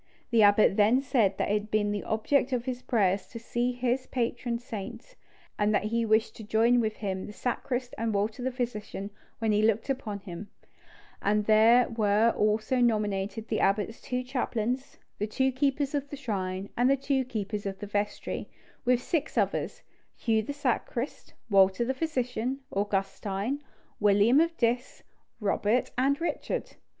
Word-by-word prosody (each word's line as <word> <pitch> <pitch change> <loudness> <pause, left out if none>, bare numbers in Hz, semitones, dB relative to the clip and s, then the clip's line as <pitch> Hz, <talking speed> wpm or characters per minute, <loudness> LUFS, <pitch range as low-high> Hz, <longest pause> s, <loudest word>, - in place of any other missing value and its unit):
The 230 -2 +5
abbot 205 -1 +5
then 215 +5 +5
said 240 -7 +2
that - - 0
it - - +3
had 210 0 -1
been 210 -1 +1
the 205 -1 -2
object 255 +4 +1
of 245 -1 -1
his 255 -1 -3
prayers 200 -6 +1
to 235 - -9
see 240 +2 -1
his 250 +1 -1
patron 240 -1 -1
saint, 235 - -8 0.4
and 210 0 +3
that - - +1
he 230 +2 0
wished 220 +1 +2
to 220 - -8
join 225 +3 +3
with 220 -2 0
him 190 -3 -4
the - - -7
sacrist 245 +1 -3
and 225 0 0
Walter 210 +3 -1
the 255 - 0
physician 215 -5 -4 0.3
when 225 -1 0
he 210 0 +3
looked 220 +4 +2
upon 215 -7 -4
him; 190 +1 -8 0.7
and 210 +1 +1
there 225 +3 +6
were 220 0 +3
also 215 +4 +1
nominated 215 -1 0
the 220 - -1
abbot's 205 +3 +1
two 250 0 -2
chaplains, 250 0 -2 0.2
the 210 - 0
two 265 +5 +1
keepers 275 +1 0
of 285 -1 -2
the 285 - -6
shrine, 195 -6 -3
and 245 +2 +3
the 275 - +4
two 270 0 0
keepers 210 -4 -4
of 195 -1 -4
the 205 - -6
vestry, 205 0 -3 0.3
with 250 0 +2
six 310 -3 -2
others, - - -1 0.3
Hugh 220 -2 +1
the 220 - -5
sacrist, 270 -2 -2 0.2
Walter 195 +1 +4
the 265 - 0
physician, 260 -3 -2
Augustine, 200 +5 -2 0.4
William 210 +6 +5
of 330 +1 +1
Diss, 240 +1 -1 0.4
Robert 210 +3 +1
and 275 +3 +2
Richard. 340 - -3
225 Hz, 165 wpm, -28 LUFS, 210-250 Hz, 0.7 s, there